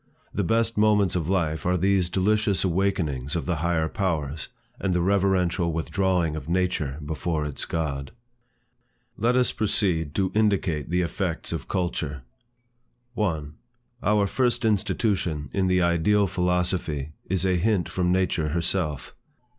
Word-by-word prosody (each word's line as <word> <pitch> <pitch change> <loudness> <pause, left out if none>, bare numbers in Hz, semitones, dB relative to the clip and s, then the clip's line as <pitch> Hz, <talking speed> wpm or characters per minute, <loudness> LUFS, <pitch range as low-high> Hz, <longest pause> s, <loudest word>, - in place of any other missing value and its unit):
The 100 - 0
best 115 +3 +1
moments 105 -4 +3
of 85 -2 -1
life 80 -5 0
are 90 +1 +1
these 95 -1 +2
delicious 100 +2 +2
awakenings 85 -7 0
of 85 - -2
the 90 -2 -1
higher 80 0 +1
powers, 80 -5 -2 0.3
and 95 -2 0
the - - +2
reverential 90 -2 +2
withdrawing 85 0 0
of 80 0 -6
nature 85 -6 0
before 80 0 -2
its 75 -2 -3
God. 70 -4 -3 1.1
Let 120 +3 +1
us 125 -1 +3
proceed 90 -8 0
to 95 -2 +1
indicate 95 -9 +1
the 90 +1 +1
effects 85 0 -2
of - - -4
culture. 80 -7 -2 0.9
1. 80 -10 -2 0.5
Our 105 -1 +3
first 120 +2 0
institution 95 - 0
in 95 -1 +1
the 90 -1 +3
Ideal 85 +5 +3
philosophy 90 -5 -1 0.2
is 95 0 +1
a 90 -1 +2
hint 100 0 +1
from 90 -1 0
nature 90 -4 +1
herself. 80 -3 -1
90 Hz, 140 wpm, -25 LUFS, 80-100 Hz, 1.1 s, moments